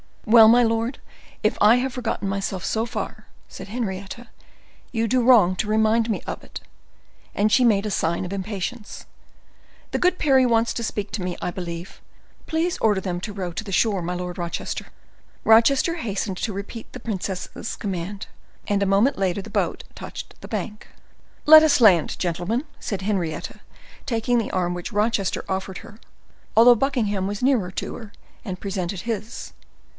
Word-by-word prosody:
"Well, 225 0 +8
my 240 +2 +6
lord, 230 +2 0 0.4
if - - +1
I 215 +3 +7
have 255 +1 -1
forgotten 230 -5 -3
myself 195 -1 -3
so 220 +3 0
far," 235 - -6 0.2
said - - -10
Henrietta, 210 +1 -5 0.6
"you 230 -1 0
do 255 +2 +2
wrong 225 -7 +5
to 215 - -1
remind 220 +1 +2
me 215 - -1
of - - -6
it." - - -9 0.8
And 210 +1 +2
she 250 +3 +5
made 210 -3 +3
a 210 - -2
sign 170 0 0
of 180 - -6
impatience. 200 +3 -5 0.9
"The - - -1
good 360 0 +2
Parry 265 -3 +4
wants 230 -1 +2
to 235 - -3
speak 205 -2 -3
to 210 - -3
me, 180 -1 -3
I - - -2
believe: 175 0 -7 0.5
please 330 +2 0
order 210 -3 +2
them 180 -2 -3
to 205 +1 -5
row 185 -3 -4
to 170 - -5
the 200 -3 -7
shore, 200 -2 +2
my 175 +1 -3
Lord 180 0 -5
Rochester." 170 -1 -4 0.6
Rochester 260 +9 +5
hastened 205 - -3
to 215 - -2
repeat 200 +4 -7
the 255 - -7
princess's 195 -1 -4
command; 195 0 -4 0.4
and 200 -1 +1
a - - +3
moment 200 +7 +3
later 190 0 0
the - - -11
boat - - -1
touched - - -9
the - - -9
bank. 210 -1 -5 0.6
"Let 310 +1 +10
us 300 -5 +3
land, 185 -8 +5
gentlemen," 180 - -1 0.2
said 200 -5 -4
Henrietta, 185 -6 -3 0.5
taking 240 0 0
the 225 - -3
arm 180 -1 0
which 175 +5 -6
Rochester 210 -2 0
offered 190 -1 -3
her, 210 - -14 0.6
although 240 +2 +8
Buckingham 215 -7 0
was 205 +3 -4
nearer 250 -9 +2
to - - -5
her, 220 -2 -10 0.3
and 185 -4 -4
had - - -31
presented 190 -2 -3
his. 225 +1 -5
210 Hz, 175 wpm, -23 LUFS, 190-235 Hz, 0.9 s, Let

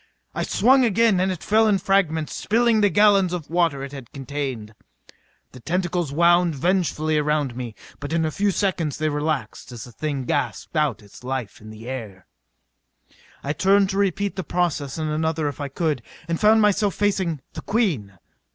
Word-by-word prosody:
I - - -3
swung 260 +3 +4
again 225 -3 +3
and 190 +1 +1
it 180 - -6
fell 220 +1 +3
in 205 -2 +3
fragments, 175 -5 0
spilling 230 0 +2
the 205 - +4
gallons 195 -1 +4
of 165 -4 -5
water 165 -6 +1
it 140 - -7
had 135 -4 -10
contained. 135 -5 -5 0.8
The 130 - -12
tentacles 175 +1 -1
wound 170 +1 +3
vengefully 155 -1 +1
around 150 -4 0
me, 120 -3 -6 0.2
but 145 - -6
in 165 -1 +1
a 155 - -1
few 205 +6 0
seconds 180 -7 -1
they 155 0 0
relaxed 150 -7 -3
as 120 -3 -8
the 120 - -11
thing 140 +2 -3
gasped 145 +3 -2
out 150 -9 0
its 100 +4 -16
life 125 -6 -4
in 110 - -11
the 110 +2 -11
air. 110 -8 -7 1.2
I 140 - -1
turned 195 +3 +3
to 195 - -3
repeat 200 0 0
the 190 - -3
process 165 -7 -1
on 155 -1 -2
another 155 0 -1
if 145 0 -5
I 145 - -2
could, 150 -1 -1 0.3
and 165 -1 -2
found 220 +1 +5
myself 205 -1 +2
facing 190 -7 0
the - - -6
Queen. 155 - -1
160 Hz, 180 wpm, -23 LUFS, 140-195 Hz, 1.2 s, found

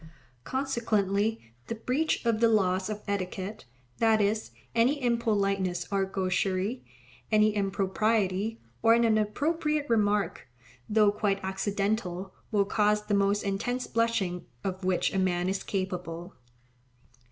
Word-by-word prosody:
Consequently 220 - 0
the 230 - -3
breach 255 +6 -1
of 230 -2 +2
the 230 - +5
laws 190 -3 +2
of 210 -1 -5
etiquette, 195 -1 -3 0.3
that 225 -1 +4
is, 210 +1 0 0.2
any 245 +6 +3
impoliteness 200 -7 0
or 195 -1 +2
gaucherie, 190 +3 -1 0.5
any 215 0 +4
impropriety, 200 +1 0 0.2
or 225 0 +6
an 235 - +3
inappropriate 290 +8 +1
remark, 210 -2 +1 0.4
though 210 -1 +5
quite 205 -1 0
accidental, 190 -1 -2 0.2
will 205 -2 +3
cause 210 +1 +2
the 210 - -1
most 200 +1 +2
intense 245 +6 -1
blushing 225 -6 0 0.2
of 190 0 -3
which 185 -1 +1
a 195 - +1
man 180 -1 +1
is 190 +1 -1
capable. 180 -2 -4
205 Hz, 120 wpm, -28 LUFS, 190-225 Hz, 0.5 s, or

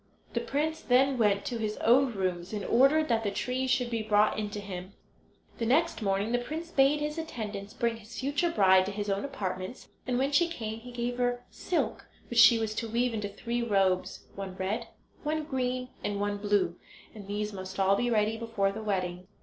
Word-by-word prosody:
The - - +1
prince 295 +6 -1
then 260 +1 +3
went 200 -2 +2
to 240 -2 -3
his 215 -1 -2
own 255 +2 +4
rooms 185 0 -2
and 205 -2 -3
ordered 280 +6 +4
that 225 -1 +2
the 205 - 0
trees 255 +5 -2
should 250 -2 +1
be 230 -1 0
brought 210 0 +3
in 210 -1 -2
to 205 - -5
him. 190 -1 -7 0.7
The 230 - 0
next 315 +3 +2
morning 200 +2 0
the 245 - +2
prince 320 +7 -5
bade 275 +1 +4
his 300 +2 -2
attendants 210 -10 -6
bring 235 -1 0
his 215 0 -10
future 290 +6 +1
bride 190 - +5
to - - -2
his 205 0 -3
own 195 +1 -1
apartments, 185 -4 -5 0.2
and 250 -1 +1
when 270 +2 +1
she 335 +4 +4
came 225 -9 -5
he 245 +2 -10
gave 245 0 -3
her 245 0 0
silk 355 - -2 0.2
which 235 - +2
she 235 - +9
was 220 -1 -1
to 230 - -2
weave 240 +2 +1
into 210 -2 -2
three 235 +4 -3
robes—one 195 -2 -1
red, 190 +4 -2 0.3
one 310 +1 -1
green, 255 -3 -2
and 205 -1 -2
one 205 0 -1
blue—and 200 0 -3
these 210 +1 -3
must 190 0 -7
all 195 +1 +4
be 245 +3 0
ready 220 -1 +2
before 225 -4 0
the 220 +2 -6
wedding. 185 -3 -2
225 Hz, 200 wpm, -29 LUFS, 200-250 Hz, 0.7 s, she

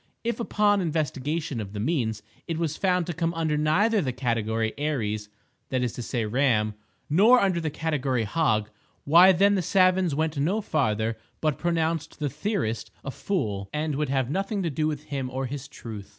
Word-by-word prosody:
If, 235 +1 -2
upon 210 -3 +2
investigation 150 -3 -2
of 100 -1 -7
the 105 - -4
means, 110 -5 -1 0.2
it 165 -2 -2
was 160 -2 -1
found 180 -2 +1
to 175 - -3
come 165 +1 -1
under 160 -2 0
neither 195 +9 +2
the 130 -6 -1
category 115 -3 -1
Aries 110 -8 -2 0.4
(that 130 -1 0
is 120 - -1
to - - -6
say 120 -1 -2
Ram) 110 -2 +2 0.3
nor 210 +11 +6
under 185 -5 +1
the 160 - -1
category 140 -6 -1
Hog, 110 -3 0 0.3
why 175 +6 +7
then 200 +3 +4
the 195 - +1
savans 185 -2 +3
went 155 0 -1
no 180 +10 +1
farther, 115 - 0 0.2
but 155 -4 0
pronounced 165 -2 -1
the 145 -3 -2
"theorist" 150 - -2 0.2
a 135 - -3
fool, 105 - -2
and 150 0 -1
would 145 0 -1
have 135 -2 +1
nothing 195 +3 -1
to 165 - -1
do 155 +2 0
with 150 -1 -3
him 140 -4 -4
or 130 +1 -3
his 135 +1 -6
truth. 110 -7 -9
150 Hz, 185 wpm, -26 LUFS, 120-170 Hz, 0.4 s, why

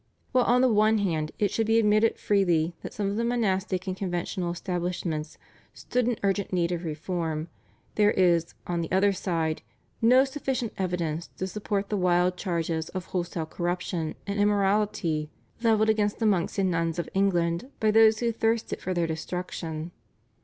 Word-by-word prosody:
While 255 -2 +3
on 245 +1 +4
the 260 - +5
one 215 +1 +4
hand 160 -7 -1
it 205 -2 +1
should 225 -1 0
be 225 0 +4
admitted 215 0 +3
freely 175 -5 +2
that - - -7
some 200 -1 -2
of 205 - -3
the 230 - 0
monastic 200 -6 0
and 185 -1 -2
conventual 175 -1 -2
establishments 170 -3 -3 0.4
stood 250 -1 -1
in 245 -3 0
urgent 200 0 0
need 175 -2 +1
of 175 0 -2
reform, 160 0 -3 0.4
there 210 -1 +4
is, 170 -4 +2
on 175 -1 -1
the 165 - -5
other 195 +2 +3
side, 165 -4 -1 0.4
no 250 +4 +6
sufficient 265 -4 -3
evidence 175 -3 -2
to 185 - -2
support 200 0 -3
the 210 - 0
wild 180 0 +2
charges 165 -3 -2
of 185 -2 -5
wholesale 175 -2 -2
corruption 175 -1 -3
and 200 0 -3
immorality 200 -6 +1 0.3
levelled 220 -2 +3
against 210 -1 0
the 225 - -1
monks 195 -4 +1
and 190 -2 +2
nuns 165 0 0
of 170 - -2
England 175 +1 +1
by 215 -1 +3
those 220 0 +5
who 235 -1 +2
thirsted 225 0 -1
for 185 0 -2
their 170 -1 +1
destruction. 165 0 -4
185 Hz, 170 wpm, -27 LUFS, 170-210 Hz, 0.4 s, no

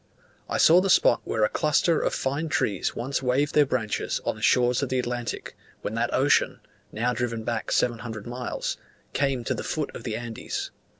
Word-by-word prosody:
I - - 0
saw 170 +3 +7
the 195 - 0
spot 120 - +5
where 110 - 0
a - - +5
cluster 155 +4 +2
of - - 0
fine 145 +4 -1
trees 100 -9 0
once 135 +4 -2
waved 135 +3 +1
their 150 -2 +5
branches 115 -5 -1
on - - 0
the - - -12
shores 125 +1 +3
of 140 - -1
the 130 - 0
Atlantic, 120 -1 -3 0.3
when 105 - -3
that 115 +1 0
ocean 140 +2 +2 0.3
(now 120 +3 0
driven 115 -2 -2
back 115 -1 -3
700 115 -3 -1
miles) 125 +1 -3 0.4
came 135 -3 0
to - - -1
the - - -4
foot 155 -2 -3
of - - -8
the 110 -3 -3
Andes. 120 -1 -5
125 Hz, 190 wpm, -26 LUFS, 115-140 Hz, 0.4 s, saw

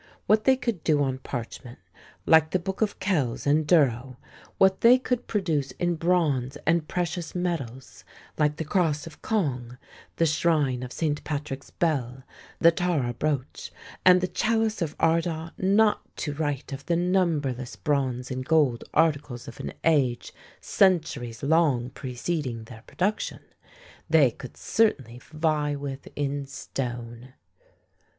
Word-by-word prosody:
What 215 0 +3
they 265 -1 +5
could 235 -10 -3
do 150 -3 +3
on 130 -1 -2
parchment 120 -1 -7 0.5
like 160 -1 +5
the 185 - +1
Books 190 +3 -5
of 210 -2 0
Kells 165 - -1
and 150 +1 +2
Durrow 130 -6 +2 0.4
what 190 0 +4
they 240 +2 +7
could 250 -1 -2
produce 160 -10 -1
in 175 -1 0
bronze 155 -7 0
and 165 0 +2
precious 175 -1 -3
metals 140 -9 -4 0.3
like 150 -1 +1
the 160 - -4
Cross 160 -2 0
of 165 - -12
Cong, 125 - -2 0.4
the 165 - +2
Shrine 150 -5 +1
of 125 -1 -6
Saint 150 0 -2
Patrick's 145 -2 -5
Bell, 130 -6 -1 0.3
the 170 - +6
Tara 160 -8 0
Brooch, 140 0 -3 0.3
and 180 0 +7
the 185 - 0
Chalice 220 +3 0
of 155 -3 -2
Ardagh 165 0 +1
not 205 +3 +3 0.2
to 145 - -3
write 145 -2 -3
of 135 0 -7
the 170 - +2
numberless 160 -8 0
bronze 130 -3 -1
and 130 0 -3
gold 145 -5 +2
articles 145 -5 +1
of - - -10
an - - -5
age 135 -7 +1 0.3
centuries 155 - +1
long 140 -5 +2
preceding 125 -1 -4
their 110 -1 -12
production 205 +4 -2 0.7
they 150 -6 +5
could 130 +1 -11
certainly 130 - 0
vie 155 -2 0
with 140 -1 -6
in 140 -1 -2
stone. 120 -2 -6
150 Hz, 140 wpm, -26 LUFS, 130-175 Hz, 0.7 s, they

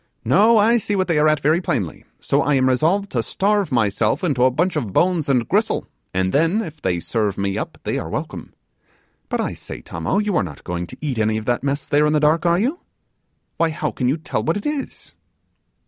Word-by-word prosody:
No, 210 - +5
I 225 +3 +4
see 205 -1 -2
what 185 -1 0
they 165 -4 +2
are 155 - +4
at 155 -1 +2
very 155 +5 +2
plainly, 105 - -3
so 140 - +1
I 145 +1 +2
am 130 -1 +3
resolved 170 +10 +1
to 120 - 0
starve 200 - 0
myself 115 - +1
into 135 -8 +2
a - - +6
bunch 170 +8 0
of 120 -10 -2
bones 170 - +1
and 125 -4 +2
gristle, - - +1 0.3
and 95 0 0
then, 165 +9 +2
if 155 -4 -9
they 90 -2 0
serve 105 +1 -1
me 100 0 -1
up, - - -4
they - - -1
are - - -6
welcome! - - -5 0.8
But - - -1
I - - -2
say, - - -8
Tommo, 85 - -2
you 210 -2 0
are - - +3
not 75 -6 -8
going 85 0 -4
to - - -11
eat 140 -6 -2
any 110 0 +1
of 110 - -5
that 120 +1 0
mess 140 +1 -1
there, 150 +1 +3
in 150 - +1
the 150 - +3
dark, 155 +3 +2
are 170 0 +4
you? 265 - 0 0.8
Why, 165 - +2
how 155 -1 -2
can 125 - -2
you 140 - +1
tell 160 - -3
what 165 +5 0
it 205 - -7
is? 295 -2 -4
150 Hz, 230 wpm, -21 LUFS, 115-180 Hz, 0.8 s, a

